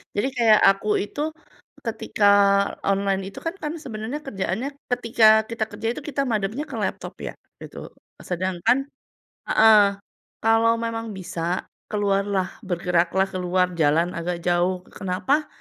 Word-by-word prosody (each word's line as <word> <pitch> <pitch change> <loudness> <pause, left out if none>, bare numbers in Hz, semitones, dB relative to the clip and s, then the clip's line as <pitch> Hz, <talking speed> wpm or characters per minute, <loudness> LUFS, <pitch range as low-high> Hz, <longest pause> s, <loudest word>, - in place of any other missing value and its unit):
Jadi 205 +6 +1
kayak 220 -3 +5
aku 195 +2 0
itu 245 +8 -4 0.6
ketika 205 - -2 0.6
online 195 0 +1
itu - - -9
kan 330 +3 -3
kan, 300 -3 -4
sebenarnya 230 +2 -5
kerjaannya 220 - -3 0.2
ketika 230 -2 +2 0.2
kita 230 -1 -2
kerja 225 - -4
itu - - -5
kita 280 -1 -1
madepnya 220 +6 -1
ke - - -6
laptop, - - -4
ya, - - -5 0.3
gitu. - - -9 0.3
Sedangkan 185 +6 0 0.7
heeh, 215 -1 +7 0.6
kalau 225 +1 +4
memang 230 -1 -4
bisa, 175 -1 -3 0.2
keluarlah, 200 -2 0 0.2
bergeraklah, 175 +1 +1
keluar 180 0 0
jalan 160 +3 +3
agak 170 0 -3
jauh. 180 +1 +1
Kenapa? 235 +11 -1
200 Hz, 125 wpm, -23 LUFS, 180-230 Hz, 0.7 s, heeh